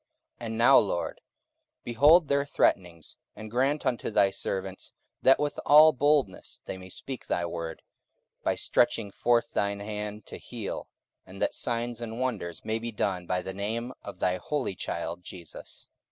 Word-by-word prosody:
44:004:029 120 - -6
And 110 0 -4
now, 120 +4 +7
Lord, 90 -4 -2 0.6
behold 145 +8 +5
their 140 0 +2
threatenings: 90 - 0 0.2
and 110 0 -9
grant 135 +5 +1
unto 120 - 0
thy 100 -3 +3
servants, 95 -1 -3 0.3
that 135 - +6
with 150 0 -1
all 155 +2 +8
boldness 145 -7 +1
they - - -5
may 95 0 -10
speak 130 +7 -7
thy 85 - 0
word, 85 -1 -5 0.6
44:004:030 - - -47
By - - +2
stretching 105 -3 +2
forth 115 +2 +1
thine 100 0 0
hand 105 0 -5
to - - -8
heal; 115 -5 -6 0.4
and 95 +1 -11
that - - +1
signs 120 0 -2
and 115 0 -5
wonders 110 -10 -3
may 110 +1 -1
be 115 +1 -4
done 95 -4 -2
by 90 0 0
the 95 - -5
name 115 +5 -3
of - - -8
thy 90 0 +1
holy 140 +1 -2
child 85 0 -4
Jesus. 85 -3 -10
110 Hz, 170 wpm, -28 LUFS, 95-125 Hz, 0.6 s, all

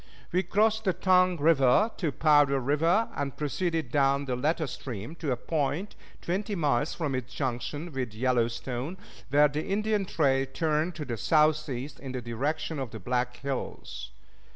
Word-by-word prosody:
We 180 +1 +2
crossed 215 +4 +2
the 185 - +3
Tongue 180 0 +3
River 155 - +4
to 165 -6 -1
Powder 145 -2 +4
River, 165 - +2
and 140 -2 -3
proceeded 160 -2 -1
down 140 0 +2
the 130 -2 -1
latter 155 +5 0
stream 125 -1 -6
to 150 -5 -2
a 125 - 0
point 155 - -2 0.3
twenty 200 +4 -2
miles 145 -3 +1
from 150 -5 -2
its 130 -1 -4
junction 130 +6 -3
with 130 -5 -3
the - - -13
Yellowstone, 125 +5 -1 0.3
where 145 +1 +6
the 150 +2 -3
Indian 210 0 0
trail 135 -6 +1
turned 160 +3 0
to 150 - -5
the 120 -3 -4
southeast 150 -1 +1
in 135 -2 -7
the 125 - -3
direction 140 +6 -2
of 130 -3 -3
the 110 - -8
Black 125 +4 -1
Hills. 130 - -5
145 Hz, 165 wpm, -28 LUFS, 130-165 Hz, 0.3 s, where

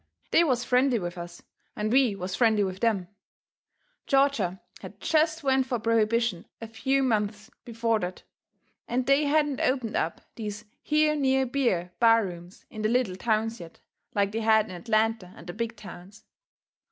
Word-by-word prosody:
They 340 - +5
was 255 -6 +1
friendly 250 0 +2
with 175 -3 -4
us, 175 0 -9 0.3
and 215 +1 -2
we 255 -6 +4
was 185 -1 -5
friendly 220 -4 +3
with 190 -1 -4
them. 210 -6 0 1.0
Georgia 270 -10 +2 0.2
had - - -11
jest 315 0 +1
went 265 -1 +2
fur 250 -2 -1
prohibition 230 -3 +1
a 230 - -6
few 265 +5 0
months 210 -3 -1
before 230 -1 0
that, 180 -1 -5 0.6
and 250 +1 -1
they 275 +3 +3
hadn't 295 -1 +1
opened 255 -4 0
up 165 - -2 0.2
these 210 -2 -6 0.2
here 305 0 +2
near 265 -2 +2
beer 240 -10 0
bar 230 -2 +5
rooms 175 0 -10
in 215 - -7
the 215 - +1
little 235 -6 +1
towns 225 +2 -1
yet, 170 -2 -12 0.4
like 200 -1 +1
they 225 - -2
had 220 -1 +4
in - - -10
Atlanta 215 0 -1
and 165 - -13
the 175 - -7
big 230 +2 -4
towns. 200 -1 -12
225 Hz, 165 wpm, -27 LUFS, 200-255 Hz, 1.0 s, They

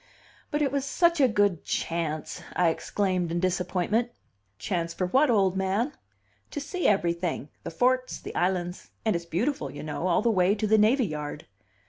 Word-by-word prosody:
"But 295 0 0
it 275 - +1
was 280 -1 0
such 340 +3 +2
a 265 - +6
good 205 -7 +1
chance!" 160 -2 -3
I 180 -2 +4
exclaimed 185 0 -1
in 170 - 0
disappointment 185 +5 0 0.5
"Chance 165 - -2
for 185 - 0
what, 270 +10 +3
old 195 -5 +3
man?" 195 +9 0 0.6
"To - - -4
see 360 +5 -1
everything 170 -5 0
the - - -5
forts, 255 +8 +1
the - - -8
islands 180 0 -1 0.2
and 220 - +2
it's 170 0 -3
beautiful, 175 - -1
you 140 - -8
know, 155 +3 -3
all 180 +3 +2
the 235 - +3
way 190 0 +3
to 215 0 -1
the 215 +1 +4
navy 235 +5 +4
yard." 150 -4 -5
190 Hz, 175 wpm, -27 LUFS, 170-235 Hz, 0.6 s, a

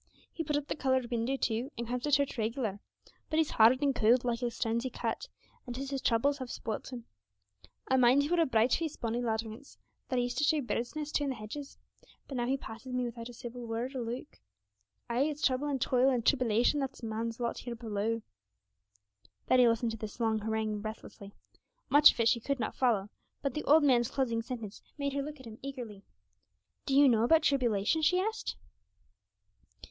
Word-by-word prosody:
He 325 - -3
put 295 -1 0
up 290 - -3
the - - -2
coloured 260 -4 0
window 240 +3 0
too, 240 +1 -1
and 235 0 -4
comes 250 +1 -2
to 295 - -1
church 280 -1 +2
reg'lar; 220 -3 -2 0.5
but 310 - -1
he's 320 -2 +2
hard 240 +5 +5
and 280 -1 +3
cold, 235 +2 +3
like 235 -1 0
the 245 -1 -1
stones 230 0 -1
he 260 - -2
cut, 245 - -3 0.4
and 245 - -5
'tis 270 +2 -5
his 270 -1 -2
troubles 280 +5 +2
have 260 -2 -6
spoilt 220 +3 -5
him. 240 -2 -7 0.8
I 260 - +3
mind 255 +3 +5
he 290 - -2
were 345 -1 +3
a 325 - +3
bright 230 0 +3
faced, 320 -3 -1
bonny 235 +1 -1
lad 225 -2 0
once, 225 +6 -11 0.3
that 255 - 0
I 245 - +2
used 245 +2 -2
to - - +1
show 305 +1 +3
birds' 240 0 -3
nests 300 -1 -4
to - - -1
in 280 - -1
the 265 - -2
hedges; 275 +7 -8 0.5
but 275 - -6
now 240 -1 -1
he 270 +2 +1
passes 245 +1 -9
me 250 0 0
wi'out 235 0 -6
a - - -10
civil 240 0 -8
word 235 +4 -3
or 255 - -2
look. 240 +4 -6 0.7
Ay, 240 +4 +1
it's 300 0 -2
trouble 260 +2 +1
and 280 -2 -1
toil 255 +1 +3
and 245 -3 0
tribbylation 250 +1 +3
that 270 -1 -2
is - - -16
man's 225 +1 -3
lot 235 -1 -2
here 240 -1 -6
below!' 225 0 -2 1.2
Betty 250 -1 +5
listened 230 0 +1
to 225 - -5
this 215 +2 -7
long 220 -2 +1
harangue 215 -1 -2
breathlessly. 215 -2 -8 0.6
Much 290 +1 +9
of - - -14
it 230 - +3
she 235 - +3
could 275 +3 -2
not - - -2
follow, 220 -6 +1 0.3
but 275 -3 -1
the 305 - -3
old 305 +2 +6
man's 245 -4 +4
closing 235 -4 0
sentence 230 -4 -7 0.2
made 280 -1 -2
her 280 - -1
look 300 +1 -7
at 260 - -12
him 220 -1 -10
eagerly. 245 -7 -7 0.9
'Do 270 - +1
you 285 0 +8
know 230 -4 +4
about 320 +6 +4
tribulation?' 250 -1 +2
she 360 +4 +3
asked. 440 +3 -2
245 Hz, 215 wpm, -31 LUFS, 230-275 Hz, 1.2 s, Much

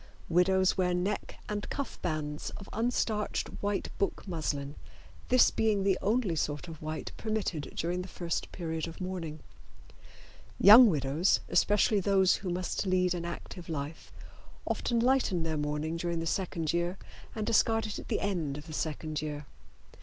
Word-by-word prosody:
Widows 185 +2 +3
wear 180 -1 +2
neck 195 +4 -2
and 205 0 -3
cuff 280 -1 -5
bands 150 -3 -3
of 195 - -10
unstarched 225 -2 0
white 205 0 -2
book 200 - -1
muslin, 145 -5 -2 0.6
this 255 0 +6
being 215 -3 +1
the 195 -1 +3
only 210 -4 +1
sort 150 +1 -2
of 160 -2 -9
white 155 0 -4
permitted 215 -9 -2
during 175 +2 -1
the 180 - -7
first 170 -2 -3
period 165 -2 -3
of 165 - -9
mourning. 175 -5 -5 1.2
Young 220 +4 +10
widows, 150 +2 +2
especially 210 0 +3
those 190 -1 +3
who 190 - -5
must 180 +2 -2
lead 180 -1 +2
an 170 -1 -4
active 170 0 -7
life, 150 0 -5 0.5
often 235 -1 0
lighten 240 -8 +2
their 160 -1 -1
mourning 150 +2 -2
during 170 0 -2
the 165 - -3
second 165 -2 -1
year 175 +2 0 0.4
and 215 -1 -2
discard 225 0 +3
it 215 - -4
at - - -10
the - - -1
end 165 -8 -1
of 150 - -9
the 160 - -9
second 155 0 -3
year. 150 -1 -5
180 Hz, 160 wpm, -30 LUFS, 160-205 Hz, 1.2 s, Young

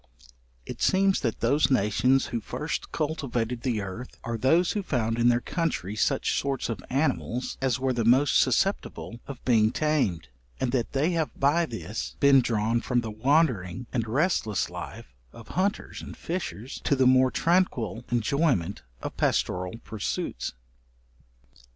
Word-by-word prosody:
It - - -8
seems 195 0 +3
that 115 -4 -2
those 140 +6 +3
nations 125 +2 +3
who 115 - -1
first 150 +9 -4
cultivated 125 -7 -2
the 120 -5 -1
earth, 100 +6 -7
are 115 0 -3
those 160 +10 +3
who 210 - -1
found 115 - -1
in 120 +1 +5
their 120 0 +3
country 155 - -2
such - - +1
sorts 140 -3 -2
of 100 -6 -4
animals 130 -3 -1
as 130 -2 +1
were 130 0 0
the 120 -1 0
most 130 +5 +4
susceptible 130 - 0
of 140 -3 -9
being 110 -3 +4
tamed, 125 - 0 0.3
and 125 - 0
that 120 0 -1
they 145 +6 +2
have 165 -3 0
by 160 +5 +3
this 115 -2 -5
been 140 -2 +6
drawn 115 0 0
from 125 -1 +1
the 110 -2 -5
wandering 125 - +1
and 115 -3 -1
restless 120 - 0
life - - -8 0.2
of 115 - -13
hunters 195 +4 -2
and - - -9
fishers, 135 - -5
to 140 - +3
the 130 -1 +3
more 130 0 +5
tranquil 130 - +1
enjoyment 120 - +1 0.2
of - - -5
pastoral 90 +4 0
pursuits. 100 - -3
125 Hz, 150 wpm, -27 LUFS, 115-145 Hz, 0.3 s, been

